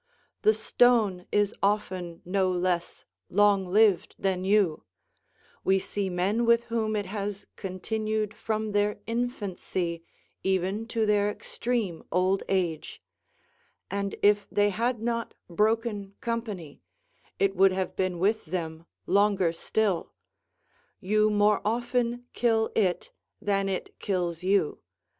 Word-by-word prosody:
The 435 +1 +4
stone 220 -7 +3
is 205 0 +2
often 185 -4 -1
no 190 +1 +1
less 180 -1 -1 0.2
long 200 -1 +3
lived 205 0 +3
than 185 -2 -1
you; 195 -5 +2 0.8
we 190 0 +4
see 195 +1 -2
men 190 +6 0
with 235 0 +4
whom 220 -2 0
it 205 -1 -1
has 200 +1 -4
continued 215 +2 -2
from 215 0 -2
their 205 0 +1
infancy 200 -7 -3 0.4
even 190 +4 0
to 225 -1 0
their 205 -1 +3
extreme 215 -4 -3
old 185 +2 +2
age; 175 -5 -1 0.9
and 200 0 -2
if 205 0 +4
they 205 0 +3
had 230 +2 -1
not 230 -1 -2
broken 210 +1 0
company, 215 -10 -4 0.6
it 195 0 +1
would 190 +1 +5
have 185 0 -2
been 185 -2 -1
with 205 +5 +1
them 165 -1 -5 0.2
longer 195 -3 +3
still; 195 +1 -1 0.9
you 215 +2 +2
more 210 0 +3
often 240 +2 -1
kill 225 -2 +2
it 180 -5 0 0.3
than 200 -2 0
it 190 - -4
kills 175 -4 -1
you. 190 -4 +1
200 Hz, 120 wpm, -27 LUFS, 185-220 Hz, 0.9 s, would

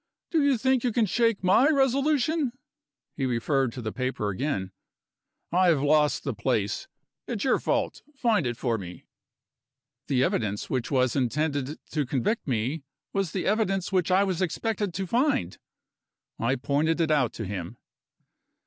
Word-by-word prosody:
Do 320 -3 +3
you 280 -3 +3
think 260 +1 +2
you 245 - +1
can 225 0 +2
shake 230 +1 +1
my 200 +10 +5
resolution?" 275 0 +2 0.6
He 135 -2 -1
referred 130 +1 +1
to 125 - -7
the 110 - -3
paper 130 -5 -2
again. 95 -4 -2 0.8
"I 180 +2 +4
have 155 -5 +3
lost 150 0 +3
the - - -2
place. - - -1 0.4
It's 230 -5 -3
your 265 - +3
fault - - -1
find 225 - +2
it 120 -1 -3
for 115 -3 -1
me." 90 -2 -9 1.0
The 130 -2 +2
evidence 105 -5 -1
which 125 -2 -1
was 130 -3 +2
intended 145 +2 -1
to 150 -2 0
convict 145 - -1
me 130 +5 -1 0.3
was 195 -5 0
the 185 - -2
evidence 195 -3 0
which 185 -2 +1
I 185 +2 +4
was 190 -2 -1
expected 205 +3 -1
to 190 +2 -2
find! 235 - 0 0.8
I 120 +4 +1
pointed 145 +5 0
it 160 -2 +2
out 130 -7 +2
to 110 - -5
him. 95 +2 -5
155 Hz, 160 wpm, -27 LUFS, -, 1.0 s, my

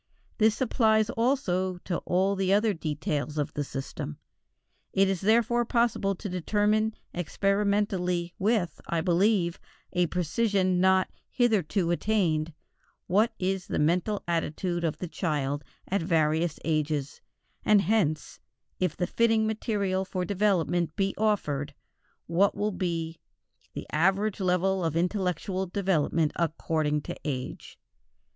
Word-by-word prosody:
This 220 0 +3
applies 220 -3 +3
also 190 -7 0
to 175 - -2
all 190 +2 +2
the 190 -1 0
other 210 +2 +3
details 150 -2 -3
of 145 - -1
the 145 - -2
system. 135 - -6 0.8
It 195 0 +4
is 190 -2 -1
therefore 235 +3 +3
possible 235 -4 +1
to 205 - -6
determine 210 +4 +1 0.2
experimentally, 190 -1 0
with, 205 -3 0
I 165 -1 0
believe, 180 0 +2 0.3
a 180 -1 +2
precision 185 +2 +1
not 190 0 +3 0.2
hitherto 205 - +1
attained, 170 -5 +1 0.5
what 215 +5 +3
is 190 0 -2
the - - -2
mental 180 +7 +1
attitude 170 +1 -1
of 160 -3 -1
the 180 - -5
child 145 -5 -2 0.2
at 200 0 0
various 160 -1 +1
ages, 150 -3 -1 0.4
and 210 -2 +5
hence, 185 -9 0 0.4
if 180 -4 0
the 180 - 0
fitting 225 +2 +2
material 205 -3 -1
for 185 -1 -3
development 180 -3 +1
be 195 -2 0
offered, 150 -10 -1 0.5
what 185 +4 +2
will 210 +1 0
be 165 -3 -3 0.5
the - - -6
average 195 +6 +1
level 185 0 +1
of 160 -2 -1
intellectual 185 +1 -1
development 170 -5 +1
according 155 -2 0
to - - -6
age. 130 -4 -5
185 Hz, 125 wpm, -28 LUFS, 165-205 Hz, 0.8 s, and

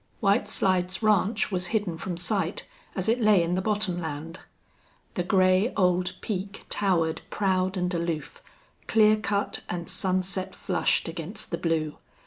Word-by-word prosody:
White 200 +2 +2
Slides 185 +1 +1
Ranch 210 0 +2
was 180 -1 0
hidden 205 -5 -1
from 170 +2 -5
sight, 185 0 +1 0.3
as 190 0 -1
it 235 +2 +2
lay 210 -5 +5
in 170 +1 -1
the 185 - +1
bottomland. 175 -6 -2 0.7
The - - -1
gray 185 +4 +3
old 180 -2 +2
peak 195 -1 -4
towered 165 -5 +1
proud 190 -1 0
and 180 0 -1
aloof, 170 - -3 0.5
clear 215 -1 +5
cut 205 -2 -2
and 175 -1 -4
sunset 185 0 -1
flushed - - +1
against 170 +6 -6
the - - -1
blue. 160 -3 -1
185 Hz, 140 wpm, -27 LUFS, 175-205 Hz, 0.7 s, lay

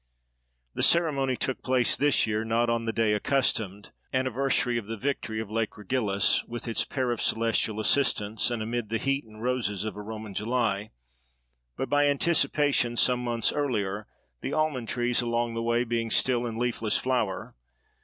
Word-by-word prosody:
The - - -3
ceremony 140 -7 +3
took 130 - -2
place 130 -2 +2
this 145 0 +3
year, 110 0 -1
not 115 +1 +1
on 115 0 -1
the 115 - 0
day 110 -2 +1
accustomed—anniversary 125 +2 0
of 105 - -10
the 115 +1 -4
victory 125 -3 -2
of 110 -2 -5
Lake 115 -1 -2
Regillus, 105 -2 +1
with 120 +1 -7
its 115 - +1
pair 130 -2 -1
of 120 - -2
celestial 115 -1 +1
assistants—and 110 -1 +1
amid 115 -1 -3
the 115 - 0
heat 135 +3 -1
and 110 0 -12
roses 115 -6 -1
of 110 - -4
a 105 - -6
Roman 110 -1 -7
July, 110 -1 -1 0.9
but, 135 - -2
by 145 0 +3
anticipation, 145 -4 +2
some 125 0 +3
months 120 -2 0
earlier, 105 -8 -2 0.3
the - - -3
almond 150 -7 0
trees 120 0 +1
along 120 0 -1
the 115 - -3
way 120 +1 +1
being 115 -1 -2
still 120 0 +2
in 115 -1 -5
leafless 115 -2 0
flower. 120 -7 -1
120 Hz, 165 wpm, -27 LUFS, 110-130 Hz, 0.9 s, ceremony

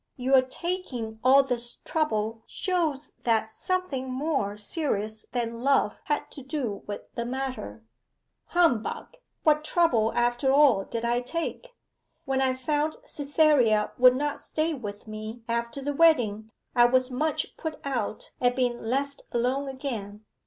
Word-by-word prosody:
Your 260 +1 +4
taking 255 -6 -4
all 270 +2 +7
this 240 -2 -2
trouble 225 -8 -1
shows 320 -6 -1
that 220 -2 +1
something 365 -8 -2
more 255 -7 -1
serious 215 -3 -2
than 235 -1 -3
love 270 -5 +2
had 295 - -1
to 280 - -8
do 260 -6 -3
with 205 - -4
the 235 - -2
matter.' 250 - -4 0.6
'Humbug 335 - +1 0.3
what 305 -1 +4
trouble 255 -10 +2
after 240 +3 +2
all 275 -8 +5
did 230 0 -4
I 240 +1 +1
take? 335 - -4 0.5
When 270 -1 0
I 260 -1 +2
found 295 +4 0
Cytherea 285 - +3
would 255 0 +7
not 290 +2 -1
stay 315 +1 -1
with 210 -7 -7
me 215 +2 -7
after 235 +3 -2
the 290 +1 -1
wedding 240 -9 +3 0.3
I 240 -1 +7
was 255 +1 +2
much 305 +5 -1
put 320 -2 -5
out 245 -6 -3
at 245 0 +3
being 245 -2 0
left 280 +4 -2
alone 255 +4 0
again. 220 -6 -5
255 Hz, 140 wpm, -27 LUFS, 230-290 Hz, 0.6 s, all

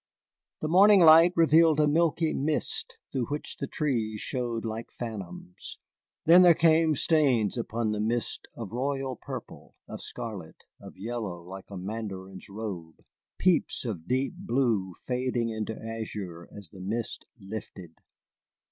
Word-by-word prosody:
The 155 - -1
morning 195 +5 +7
light 165 +1 +8
revealed 160 -1 +5
a 150 - +4
milky 160 +1 +2
mist 155 - -1
through 130 -4 -1
which 145 +1 -4
the 140 - -4
trees 115 -9 -1
showed 120 -2 -3
like 110 +1 -5
phantoms. 100 -6 -7 0.5
Then 170 +3 +8
there 175 -2 +7
came 160 -1 +4
stains 135 -9 +2
upon 115 -2 -2
the 105 - -2
mist 115 +3 -2
of 115 -5 -7
royal 135 +1 -2
purple, - - -9
of - - -8
scarlet, 100 -8 -7 0.2
of - - -12
yellow 105 -5 -5
like 95 +2 -10
a 100 - -7
mandarin's 95 -1 -6
robe, 95 -6 -7 0.3
peeps 180 -6 +1
of 90 -8 -5
deep 130 +6 0
blue 120 - 0
fading 125 -2 -1
into 110 0 -4
azure 105 -6 -6
as 100 -6 -11
the 95 - -11
mist 110 +5 -4
lifted. 95 -4 -8
115 Hz, 140 wpm, -28 LUFS, 105-150 Hz, 0.5 s, light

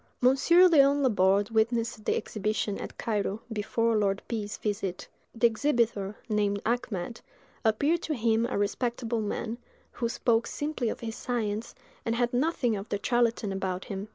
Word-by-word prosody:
Monsieur 275 +8 +6
Léon 285 -3 +5
Laborde 200 -3 +3
witnessed 225 -1 0
the - - +2
exhibition, 210 -1 -2
at - - -7
Cairo, 210 -2 -1
before 225 +2 0
Lord 200 -2 +1
P——'s 210 -3 -3
visit; 200 -4 -3 0.3
the 230 - +2
exhibitor, 230 -5 +1
named 205 -2 +1
Achmed, 230 -3 -2 0.4
appeared 285 +10 +2
to 310 - -2
him 230 -1 +2
a 250 - -2
respectable 230 +2 -1
man, 225 +2 -3 0.3
who 235 -1 -2
spoke 235 -1 +1
simply 290 -6 -2
of - - -5
his 225 -1 -4
science, 225 -3 -3 0.3
and 230 - -1
had 240 0 0
nothing 250 -3 +1
of 200 +1 -6
the 205 - -1
charlatan 235 -4 +1
about 190 -1 -3
him. 195 +1 -5
225 Hz, 155 wpm, -28 LUFS, 205-245 Hz, 0.4 s, Monsieur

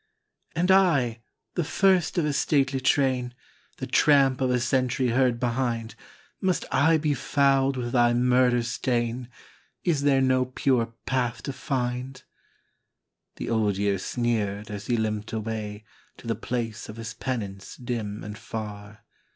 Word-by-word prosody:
" - - -41
And 180 +3 +2
I, 140 -12 +3 0.3
the 175 - 0
first 185 +1 +2
of 170 - +2
a 150 - 0
stately 135 -2 +1
train, 130 -2 +1 0.4
The - - -4
tramp 135 -3 +4
of 130 - +2
a 125 0 +2
century 130 +1 +1
heard 125 0 +2
behind, 120 -2 -1 0.5
Must 185 -2 0
I 160 +5 +4
be 150 -1 0
fouled 135 0 +2
with 120 -1 -3
thy 120 -1 +3
murder 125 0 +3
stain? 120 0 -2 0.5
Is 160 -5 +1
there 140 -1 +3
no 130 -1 +3
pure 125 -2 +1 0.2
path 125 -2 -1
to 140 - -4
find? 130 -1 -3 0.5
" - - -56
The - - -4
Old 105 -4 +1
Year 100 -1 +1
sneered 105 -2 -2
as 105 -1 -6
he 120 - +1
limped 110 -1 -2
away 110 -1 -4 0.3
To - - -15
the - - 0
place 115 -3 -4
of 110 - -7
his 115 0 -6
penance 105 -5 -5
dim 115 -4 -4
and 105 +1 -7
far. 105 -2 -7
125 Hz, 150 wpm, -26 LUFS, 115-135 Hz, 0.5 s, tramp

